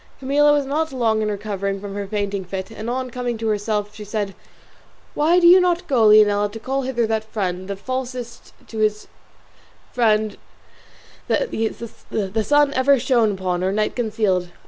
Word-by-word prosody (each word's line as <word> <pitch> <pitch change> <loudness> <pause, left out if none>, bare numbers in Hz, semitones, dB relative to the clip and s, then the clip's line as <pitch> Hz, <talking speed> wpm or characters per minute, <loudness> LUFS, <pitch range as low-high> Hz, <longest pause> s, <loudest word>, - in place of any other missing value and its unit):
Camilla 290 +2 +3
was 290 -1 +2
not 310 +3 -1
long 225 -4 +1
in 215 - 0
recovering 200 -1 -3
from 200 0 -7
her 200 0 -4
fainting 200 -1 -2
fit 190 +3 -6
and 225 +1 -6
on 255 0 -3
coming 245 -1 -3
to 225 - -5
herself 210 0 -1
she 215 0 -9
said, 205 -1 -3 0.8
"Why 325 +4 +3
do 350 - +2
you 355 +2 +9
not 355 -1 +1
go, 245 -8 +3
Leonela, 205 -1 +5
to 225 - -7
call 265 +4 -2
hither 255 -3 -1
that 220 0 -1
friend, 190 -4 -4
the 200 - -3
falsest 250 +2 -6
to 220 - -7
his 215 0 0 0.8
friend 215 -3 +1 0.9
the 220 - -2
sun 290 +2 +3
ever 270 +2 +4
shone 240 -4 +2
upon 185 -2 -2
or 190 - +1
night 215 +1 -1
concealed? 210 -6 0
220 Hz, 170 wpm, -21 LUFS, 205-255 Hz, 0.9 s, you